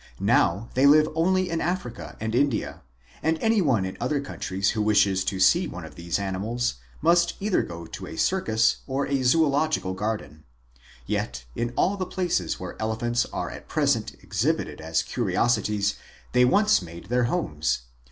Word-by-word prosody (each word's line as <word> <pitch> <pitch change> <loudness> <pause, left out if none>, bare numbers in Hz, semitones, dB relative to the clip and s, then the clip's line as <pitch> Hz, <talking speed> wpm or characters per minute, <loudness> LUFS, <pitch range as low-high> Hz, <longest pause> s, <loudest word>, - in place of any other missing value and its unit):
Now 100 +7 +2
they 135 +2 +4
live 155 +2 +6
only 185 +3 +2
in 165 - -1
Africa 175 -9 -4
and 110 0 -3
India, 130 -2 0 0.4
and 160 +1 +1
any 220 +4 +2
one 120 - +2
in 95 - -6
other 150 -2 0
countries 95 -8 -2
who 110 - -1
wishes 100 -3 +3
to 95 0 -2
see 170 - +4
one 90 -3 -7
of 80 - -11
these 85 0 -2
animals 100 - -2 0.3
must 170 +1 +3
go 200 - -5
either 85 - -1
to 95 +2 -8
a - - -8
circus 115 -12 +2
or 135 +1 -1
a 140 -1 0
zoolog 155 +3 +3
ical 95 0 -4
garden. 95 -8 -4 0.6
Yet, - - -3
in 120 0 -2
all 200 +2 +2
the 185 -2 -3
places 170 - -1
where - - -7
elephants 120 +2 0
are - - -3
at - - -10
present - - +1
exhibited - - -1
as 80 0 0
curiosities, 105 -2 0 0.3
they 125 0 +5
once 205 - +4
made 85 +1 -10
their 125 0 +2
homes. 80 - -1
120 Hz, 170 wpm, -25 LUFS, 95-155 Hz, 0.6 s, live